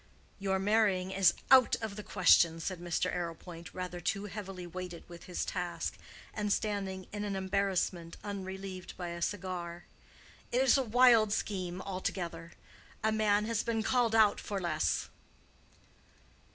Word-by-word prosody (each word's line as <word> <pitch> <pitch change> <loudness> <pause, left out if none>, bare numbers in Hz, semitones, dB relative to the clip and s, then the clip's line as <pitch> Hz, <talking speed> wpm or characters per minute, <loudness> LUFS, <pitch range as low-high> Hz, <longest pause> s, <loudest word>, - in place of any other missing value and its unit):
"Your 195 -1 0
marrying 195 -2 +2
is 190 -1 +4 0.2
out 260 -2 +7
of 220 -3 -5
the 210 - -5
question," 175 -4 +4
said 180 +2 -4
Mr. 175 +1 -1
Arrowpoint, 170 -1 -6
rather 180 -1 -5
too 195 +4 -1
heavily 195 -3 -6
weighted 175 0 -7
with 170 -1 -11
his 180 - -3
task, 180 -2 -3 0.4
and 210 -1 -1
standing 195 -3 -1
in 205 0 -3
an 205 -1 -2
embarrassment 190 -3 -1
unrelieved 190 -2 -6
by 175 -1 -4
a 170 0 -6
cigar. 175 -2 -3 0.7
"It 245 - +2
is 265 - +5
a 275 - +3
wild 235 -3 +5
scheme 185 -3 -2
altogether. 170 -3 -4 0.5
A 220 - +3
man 210 -1 +2
has 225 -1 0
been 225 -2 -1
called 235 -1 +2
out 215 -2 +5
for 200 -1 -3
less." 170 -4 0
190 Hz, 145 wpm, -32 LUFS, 175-210 Hz, 0.7 s, out